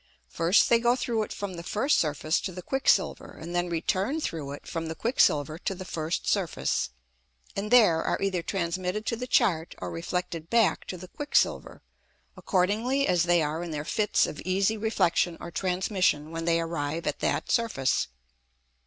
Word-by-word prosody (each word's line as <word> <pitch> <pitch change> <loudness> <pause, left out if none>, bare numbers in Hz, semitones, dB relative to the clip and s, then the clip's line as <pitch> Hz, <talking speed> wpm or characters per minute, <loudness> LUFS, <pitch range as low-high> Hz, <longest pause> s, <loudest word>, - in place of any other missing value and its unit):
First, 170 +4 +3
they 235 - +4
go 240 +1 +3
through 235 -3 -1
it 215 - -4
from 200 -2 -5
the 170 - -6
first 215 - +1
Surface 155 0 0
to 190 - -4
the 180 0 -8
Quick 270 +6 0
silver, - - +1
and 170 +2 -7
then 175 0 0
return 190 - 0
through 155 - -4
it 145 - -10
from 165 -1 -4
the 160 - -4
Quick 235 +8 -3
silver 150 +2 +3
to 195 - -3
the 185 0 -8
first 165 -1 -3
Surface, 190 - 0 0.7
and 205 +2 -3
there 210 -10 +6
are - - 0
either 190 -3 0
transmitted 185 +3 -2
to 230 - 0
the 250 +2 -5
Chart 190 -10 +2
or - - -5
reflected 165 -1 -4
back 230 -3 +2
to 185 - -5
the 180 +1 -10
Quick 290 +10 -7
silver, - - +1 0.5
accordingly 220 +9 +1
as 175 -1 +3
they 175 -2 +3
are 155 +2 -2
in 175 - -5
their 150 -1 -4
Fits 210 +3 +2
of - - -6
easy 195 +4 +1
Reflexion 180 -6 +1
or 170 - -8
Transmission 180 -3 0
when 165 0 -4
they 165 0 +3
arrive 165 -1 -3
at 150 - -2
that - - -1
Surface. 170 - +1
180 Hz, 190 wpm, -27 LUFS, 165-215 Hz, 0.7 s, there